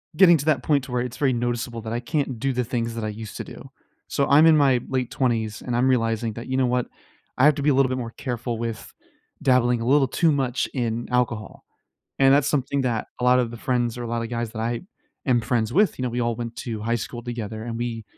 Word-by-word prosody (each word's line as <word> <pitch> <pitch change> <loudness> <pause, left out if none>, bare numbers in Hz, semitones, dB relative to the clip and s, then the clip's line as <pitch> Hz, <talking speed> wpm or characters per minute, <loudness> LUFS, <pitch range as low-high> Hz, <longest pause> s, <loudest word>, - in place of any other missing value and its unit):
getting 175 -1 +7
to 145 - -5
that 145 -6 +2
point 145 -3 +2
to 125 - -10
where 125 -1 0
it's 125 -1 -5
very 135 -4 +2
noticeable 120 -1 -2
that 110 +1 -5
I 120 - -1
can't 135 -1 -2
do 135 +3 0
the 125 0 0
things 115 -1 -3
that 115 - -4
I 110 - -1
used 110 0 -8
to - - -4
do. - - -11 0.4
So 140 - 0
I'm 150 +3 +6
in 160 -1 +7
my 135 -4 +4
late 130 -2 -2
20s 115 -4 -1
and 125 - -3
I'm 125 +2 +3
realizing 115 -3 +1
that, 115 +3 -8
you 130 - -2
know 130 -1 +3
what, 125 0 0 0.5
I - - +3
have 150 0 +6
to 145 - -3
be 150 - +2
a - - +4
little 135 -1 +3
bit 130 - -1
more 115 -2 -5
careful 120 -2 -3
with 115 -1 -5 0.5
dabbling 125 -2 +3
a - - -3
little 135 +2 +4
too 165 +5 +2
much 135 -3 0
in 120 -2 -2
alcohol. 120 -3 -1 0.5
And 135 0 +6
that's 140 -1 +3
something 140 -1 0
that 120 -4 -1
a 125 - -2
lot 125 0 +5
of 120 -2 0
the 120 - -8
friends 120 -1 -1
or 120 - -5
a - - -4
lotta 115 0 -2
guys 120 -1 -3
that 110 0 -6
I 115 +1 -2 0.4
am 120 -2 +3
friends 115 0 -1
with, 205 +4 +3
you - - -3
know, - - 0
we 120 +1 -2
all 115 -1 0
went 115 -1 -5
to 115 -3 -5
high 115 +2 0
school 120 +1 -4
together 110 -2 -5
and 115 -1 -4
we 115 -2 -4
120 Hz, 260 wpm, -24 LUFS, 115-130 Hz, 0.5 s, getting